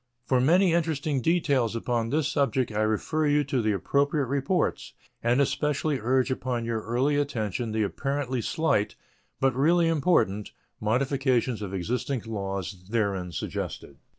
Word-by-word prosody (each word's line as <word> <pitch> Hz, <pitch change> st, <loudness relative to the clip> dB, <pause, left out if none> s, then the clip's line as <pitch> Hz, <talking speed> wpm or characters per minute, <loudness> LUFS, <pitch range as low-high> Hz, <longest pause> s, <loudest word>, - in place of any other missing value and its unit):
For 130 Hz, -2 st, +2 dB
many 175 Hz, +6 st, +4 dB
interesting 155 Hz, -4 st, 0 dB
details 140 Hz, -8 st, +1 dB
upon 115 Hz, -1 st, -1 dB
this 150 Hz, +1 st, +1 dB
subject 130 Hz, -3 st, 0 dB
I 105 Hz, -, -2 dB
refer 110 Hz, +8 st, 0 dB
you 145 Hz, 0 st, +3 dB
to 135 Hz, -2 st, -1 dB
the 110 Hz, -1 st, +1 dB
appropriate 140 Hz, +7 st, +1 dB
reports, 140 Hz, +7 st, -1 dB, 0.3 s
and 120 Hz, +3 st, +2 dB
especially 145 Hz, +1 st, 0 dB
urge 130 Hz, +3 st, +1 dB
upon 125 Hz, -2 st, -2 dB
your 115 Hz, -1 st, -2 dB
early 125 Hz, +7 st, +1 dB
attention 120 Hz, -5 st, -2 dB
the 110 Hz, 0 st, +1 dB
apparently 130 Hz, +3 st, -2 dB
slight, 115 Hz, -5 st, 0 dB, 0.4 s
but 135 Hz, -2 st, +2 dB
really 165 Hz, +5 st, +3 dB
important, 130 Hz, -, +1 dB, 0.3 s
modifications 130 Hz, 0 st, +1 dB
of 100 Hz, -3 st, -4 dB
existing 120 Hz, +7 st, -2 dB
laws 95 Hz, -4 st, -4 dB
therein 100 Hz, -5 st, -1 dB
suggested. -, -, -5 dB
130 Hz, 140 wpm, -27 LUFS, 110-145 Hz, 0.4 s, many